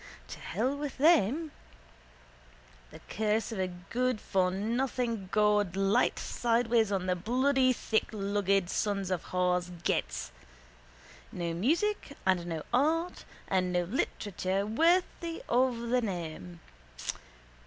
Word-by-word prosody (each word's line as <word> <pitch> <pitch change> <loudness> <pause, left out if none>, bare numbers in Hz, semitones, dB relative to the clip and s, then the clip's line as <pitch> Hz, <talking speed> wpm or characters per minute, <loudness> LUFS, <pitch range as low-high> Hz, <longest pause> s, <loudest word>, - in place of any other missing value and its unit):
To - - -8
hell 240 - -1
with 285 -1 -5
them! 310 - +3 1.4
The - - -13
curse 220 +2 0
of 220 - -4
a 185 -1 -1 0.2
goodfornothing 230 -1 0
God 210 -3 +2
light 195 +5 +2
sideways 230 -2 +1
on 190 -2 0
the 180 -1 +1
bloody 255 +7 +2
thicklugged 200 -5 0
sons 195 0 -1
of 185 - -2
whores' 180 -1 0
gets! - - -1 1.0
No 170 -1 -3
music 310 - 0
and 180 -2 +2
no 160 -3 -3
art 320 +7 +1 0.2
and 185 -1 +1
no 180 0 +1
literature 195 - -2
worthy 335 - +1
of 250 0 +2
the 250 +1 +3
name. 160 - -5
210 Hz, 110 wpm, -30 LUFS, 185-255 Hz, 1.4 s, them